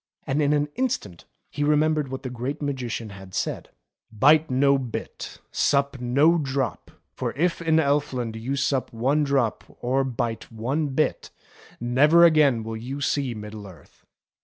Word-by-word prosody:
And 140 Hz, +3 st, 0 dB
in 145 Hz, 0 st, +2 dB
an 145 Hz, 0 st, +2 dB
instant 240 Hz, -, -2 dB, 0.3 s
he 145 Hz, -, -2 dB
remembered 150 Hz, 0 st, +2 dB
what 130 Hz, +1 st, -6 dB
the 130 Hz, -, -5 dB
Great 125 Hz, +5 st, -4 dB
Magician 125 Hz, -6 st, -4 dB
had 95 Hz, -1 st, -11 dB
said: -, -, -3 dB, 0.3 s
" -, -, -69 dB
Bite 150 Hz, +8 st, +4 dB
no 140 Hz, +2 st, +3 dB
bit, 125 Hz, -4 st, -6 dB
sup 140 Hz, -1 st, +1 dB
no 145 Hz, +8 st, +3 dB
drop, 135 Hz, -3 st, -2 dB, 0.2 s
for -, -, -3 dB
if 170 Hz, +4 st, 0 dB
in 160 Hz, -1 st, +3 dB
Elf 145 Hz, 0 st, +1 dB
land 120 Hz, -4 st, -3 dB
you 120 Hz, +5 st, -3 dB
sup 140 Hz, -1 st, 0 dB
one 135 Hz, +6 st, +1 dB
drop 135 Hz, -6 st, 0 dB, 0.2 s
or 130 Hz, +2 st, +1 dB
bite 120 Hz, -3 st, -3 dB
one 130 Hz, +8 st, -1 dB
bit, 145 Hz, +3 st, -1 dB, 0.5 s
never 145 Hz, +8 st, +5 dB
again 145 Hz, -8 st, +4 dB
will 110 Hz, 0 st, -5 dB
you 130 Hz, +5 st, -6 dB
see 135 Hz, -3 st, -1 dB
Middle 105 Hz, -1 st, -8 dB
Earth." 85 Hz, -7 st, -17 dB
135 Hz, 160 wpm, -24 LUFS, 120-150 Hz, 0.5 s, never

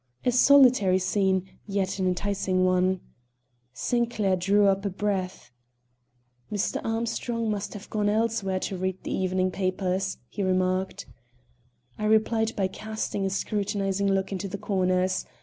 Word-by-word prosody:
A 250 Hz, -, +4 dB
solitary 250 Hz, -7 st, +6 dB
scene, 190 Hz, 0 st, +1 dB, 0.2 s
yet 195 Hz, -1 st, -1 dB
an 185 Hz, -, +1 dB
enticing 185 Hz, 0 st, 0 dB
one. 185 Hz, 0 st, +2 dB, 0.7 s
Sinclair 220 Hz, -, 0 dB
drew 200 Hz, +3 st, +3 dB
a 195 Hz, -, +5 dB
deep 195 Hz, -1 st, -5 dB
breath. 190 Hz, -8 st, -2 dB, 1.0 s
"Mr. 205 Hz, -2 st, -1 dB
Armstrong 230 Hz, 0 st, -2 dB
must 205 Hz, +1 st, -4 dB
have 205 Hz, -, -9 dB
gone 210 Hz, -1 st, +1 dB
elsewhere 210 Hz, -3 st, 0 dB
to 190 Hz, -, -3 dB
read 185 Hz, 0 st, -3 dB
the -, -, -3 dB
evening 185 Hz, 0 st, 0 dB
papers," 185 Hz, 0 st, -1 dB
he 205 Hz, -, -6 dB
remarked. 185 Hz, +1 st, 0 dB, 0.9 s
I 215 Hz, -, -2 dB
replied 220 Hz, +1 st, +2 dB
by 195 Hz, -2 st, +1 dB
casting 215 Hz, -1 st, -3 dB
a -, -, -1 dB
scrutinizing 200 Hz, 0 st, -1 dB
look 195 Hz, 0 st, 0 dB
into 195 Hz, +1 st, -3 dB
the 195 Hz, -, -5 dB
corners. 185 Hz, -1 st, 0 dB
195 Hz, 135 wpm, -26 LUFS, 185-210 Hz, 1.0 s, solitary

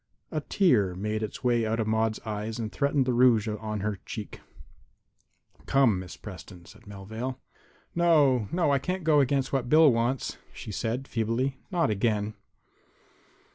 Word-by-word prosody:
A 155 Hz, -, -2 dB
tear 115 Hz, -, +2 dB
made 105 Hz, +3 st, -2 dB
its 110 Hz, +3 st, -5 dB
way 120 Hz, -2 st, +2 dB
out 110 Hz, +1 st, -1 dB
of 110 Hz, -, +1 dB
Maude's 110 Hz, 0 st, 0 dB
eyes 110 Hz, +1 st, -4 dB
and 110 Hz, -2 st, -4 dB
threatened 140 Hz, -1 st, +1 dB
the 125 Hz, -, 0 dB
rouge 120 Hz, -3 st, +4 dB
on 105 Hz, -1 st, -4 dB
her 105 Hz, -1 st, -2 dB
cheek. 105 Hz, -3 st, -7 dB, 1.3 s
"Come, 130 Hz, -8 st, +3 dB
Miss 90 Hz, -2 st, -9 dB
Preston," 90 Hz, -2 st, -11 dB
said 105 Hz, +2 st, -17 dB
Melvale. 110 Hz, +6 st, -6 dB, 0.5 s
"No, 145 Hz, -10 st, +3 dB
no; 170 Hz, -4 st, +2 dB
I 140 Hz, -, +3 dB
can't 180 Hz, +6 st, -3 dB
go 155 Hz, -2 st, +4 dB
against 135 Hz, 0 st, +1 dB
what 130 Hz, -3 st, 0 dB
Bill 155 Hz, -2 st, +6 dB
wants," 120 Hz, +3 st, -1 dB
she -, -, -8 dB
said, 120 Hz, +6 st, -3 dB
feebly; 120 Hz, +4 st, -1 dB
"not 175 Hz, -, +1 dB
again." 105 Hz, 0 st, 0 dB
115 Hz, 155 wpm, -27 LUFS, 105-135 Hz, 1.3 s, Bill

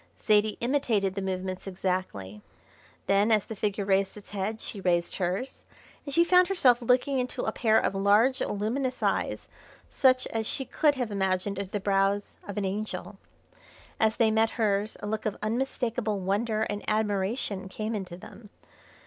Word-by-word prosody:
Zaidie 215 Hz, 0 st, +2 dB
imitated 235 Hz, -7 st, +1 dB
the 195 Hz, -, -3 dB
movements 185 Hz, 0 st, -4 dB
exactly. 180 Hz, -, -3 dB, 0.6 s
Then, 200 Hz, +3 st, +3 dB
as 215 Hz, -2 st, +3 dB
the 220 Hz, -, -7 dB
figure 205 Hz, 0 st, -1 dB
raised 195 Hz, +1 st, +1 dB
its 205 Hz, -, -12 dB
head 205 Hz, +2 st, -3 dB
she 205 Hz, -, -7 dB
raised 175 Hz, -2 st, +1 dB
hers, 190 Hz, +8 st, -3 dB, 0.4 s
and 285 Hz, -, -5 dB
she 335 Hz, +5 st, +5 dB
found 360 Hz, +1 st, +5 dB
herself 260 Hz, -11 st, +4 dB
looking 255 Hz, +3 st, +2 dB
into 250 Hz, 0 st, -3 dB
a -, -, 0 dB
pair 220 Hz, -2 st, +3 dB
of -, -, 0 dB
large, 210 Hz, +7 st, +3 dB
luminous 250 Hz, +6 st, -2 dB
eyes -, -, 0 dB, 0.4 s
such 255 Hz, -1 st, +3 dB
as 220 Hz, -1 st, -2 dB
she 270 Hz, -, -2 dB
could 295 Hz, +3 st, +2 dB
have 245 Hz, -5 st, -3 dB
imagined 190 Hz, 0 st, -1 dB
under 200 Hz, -2 st, -4 dB
the 205 Hz, -, -2 dB
brows 200 Hz, 0 st, 0 dB
of 200 Hz, -, -6 dB
an 205 Hz, -, 0 dB
angel. 210 Hz, +3 st, -4 dB, 0.8 s
As 220 Hz, 0 st, +3 dB
they 225 Hz, -2 st, +3 dB
met 220 Hz, +1 st, +3 dB
hers 210 Hz, -2 st, 0 dB
a -, -, -5 dB
look 215 Hz, +1 st, -2 dB
of 210 Hz, -, -3 dB
unmistakable 230 Hz, -2 st, -1 dB
wonder 215 Hz, +4 st, 0 dB
and 205 Hz, -1 st, -3 dB
admiration 205 Hz, -1 st, -1 dB
came 215 Hz, +3 st, -4 dB
into 185 Hz, -5 st, -5 dB
them. 210 Hz, +3 st, -13 dB
210 Hz, 165 wpm, -28 LUFS, 195-235 Hz, 0.8 s, she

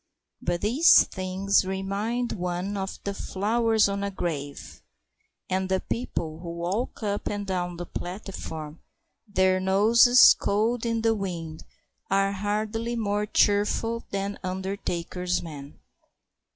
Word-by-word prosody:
But 175 Hz, 0 st, -1 dB
these 255 Hz, +11 st, +6 dB
things 190 Hz, +2 st, 0 dB
remind 200 Hz, +6 st, -2 dB
one 180 Hz, +1 st, -3 dB
of 190 Hz, -1 st, -4 dB
the 200 Hz, -, -2 dB
flowers 220 Hz, +3 st, +1 dB
on 200 Hz, 0 st, -2 dB
a 200 Hz, -, -1 dB
grave. 145 Hz, -7 st, -5 dB, 0.7 s
And 185 Hz, 0 st, -1 dB
the 190 Hz, 0 st, +2 dB
people 165 Hz, -10 st, -4 dB
who 170 Hz, 0 st, -7 dB
walk 185 Hz, +8 st, -3 dB
up 205 Hz, -1 st, -2 dB
and 205 Hz, -1 st, -3 dB
down 180 Hz, -2 st, -2 dB
the 175 Hz, -, -5 dB
platform, 170 Hz, -5 st, -7 dB, 0.5 s
their 190 Hz, -2 st, +2 dB
noses 220 Hz, +6 st, +7 dB
cold 225 Hz, +4 st, 0 dB
in 230 Hz, -1 st, -1 dB
the 225 Hz, 0 st, +4 dB
wind, 170 Hz, -6 st, -5 dB, 0.4 s
are 195 Hz, 0 st, +2 dB
hardly 215 Hz, +4 st, -2 dB
more 210 Hz, -2 st, -1 dB
cheerful 210 Hz, +3 st, +1 dB
than 200 Hz, +1 st, -3 dB
undertakers' 185 Hz, -1 st, -3 dB
men. 145 Hz, -4 st, -9 dB
195 Hz, 125 wpm, -26 LUFS, 180-215 Hz, 0.7 s, noses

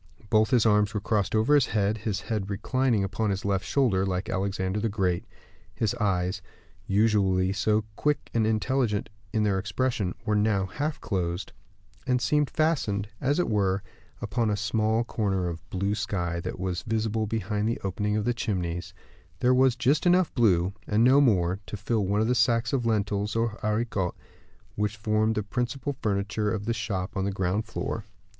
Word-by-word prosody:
Both 110 Hz, 0 st, +4 dB
his 125 Hz, -4 st, +3 dB
arms 105 Hz, -1 st, +3 dB
were -, -, +1 dB
crossed 105 Hz, 0 st, 0 dB
over 110 Hz, +7 st, +3 dB
his 145 Hz, -3 st, +5 dB
head, 105 Hz, 0 st, 0 dB
his 105 Hz, -2 st, -2 dB
head 105 Hz, -3 st, -3 dB
reclining 115 Hz, +2 st, +1 dB
upon 105 Hz, +2 st, -1 dB
his 100 Hz, 0 st, -2 dB
left 100 Hz, -1 st, 0 dB
shoulder, 115 Hz, -9 st, +2 dB
like 95 Hz, -1 st, -2 dB
Alexander 95 Hz, +1 st, -1 dB
the 115 Hz, +2 st, 0 dB
Great. 95 Hz, -4 st, 0 dB, 0.5 s
His 110 Hz, -3 st, 0 dB
eyes, 95 Hz, -2 st, 0 dB, 0.5 s
usually 95 Hz, -3 st, +2 dB
so 105 Hz, +1 st, +1 dB
quick 150 Hz, +5 st, -1 dB
and 110 Hz, -2 st, +2 dB
intelligent 110 Hz, -1 st, 0 dB, 0.2 s
in 110 Hz, -, +1 dB
their 100 Hz, -2 st, +2 dB
expression, 100 Hz, -1 st, -1 dB
were 105 Hz, -2 st, +1 dB
now 105 Hz, -2 st, +2 dB
half 145 Hz, +10 st, -3 dB
closed, 90 Hz, -2 st, -2 dB, 0.5 s
and 125 Hz, 0 st, +2 dB
seemed 145 Hz, +3 st, +2 dB
fastened, 110 Hz, -11 st, 0 dB
as 140 Hz, +2 st, +1 dB
it 180 Hz, -, +1 dB
were, 100 Hz, -2 st, +1 dB, 0.4 s
upon 110 Hz, +1 st, 0 dB
a 105 Hz, -, 0 dB
small 110 Hz, +2 st, +1 dB
corner 100 Hz, -6 st, -1 dB
of 85 Hz, -1 st, -7 dB
blue 100 Hz, +2 st, -1 dB
sky 95 Hz, -5 st, -2 dB
that 85 Hz, -, -5 dB
was 90 Hz, -1 st, -2 dB
visible 110 Hz, 0 st, -1 dB
behind 105 Hz, -1 st, -1 dB
the 115 Hz, -, -2 dB
opening 105 Hz, +2 st, -1 dB
of 105 Hz, -, -1 dB
the 120 Hz, -, +2 dB
chimneys; 90 Hz, -7 st, -3 dB, 0.4 s
there 125 Hz, +1 st, +4 dB
was 130 Hz, -1 st, +4 dB
just 135 Hz, +7 st, +2 dB
enough 180 Hz, 0 st, +3 dB
blue, 95 Hz, -7 st, +3 dB
and 105 Hz, +2 st, +3 dB
no 130 Hz, +3 st, +6 dB
more, 95 Hz, -8 st, +2 dB
to 105 Hz, -, -5 dB
fill 110 Hz, -1 st, 0 dB
one 100 Hz, +2 st, +1 dB
of 110 Hz, -, +1 dB
the 125 Hz, -, +3 dB
sacks 115 Hz, 0 st, +2 dB
of 125 Hz, -4 st, +1 dB
lentils, 105 Hz, -1 st, 0 dB
or 115 Hz, -1 st, 0 dB
haricots, 105 Hz, -4 st, -1 dB, 0.6 s
which 105 Hz, +1 st, -1 dB
formed 110 Hz, +1 st, +1 dB
the 105 Hz, -, -1 dB
principal 125 Hz, +6 st, -3 dB
furniture 105 Hz, +1 st, 0 dB
of 105 Hz, -2 st, -3 dB
the 115 Hz, -, 0 dB
shop 105 Hz, -3 st, -3 dB
on 95 Hz, -, 0 dB
the 100 Hz, -, 0 dB
ground 95 Hz, +3 st, -1 dB
floor. 115 Hz, 0 st, -4 dB
105 Hz, 180 wpm, -27 LUFS, 100-115 Hz, 0.6 s, no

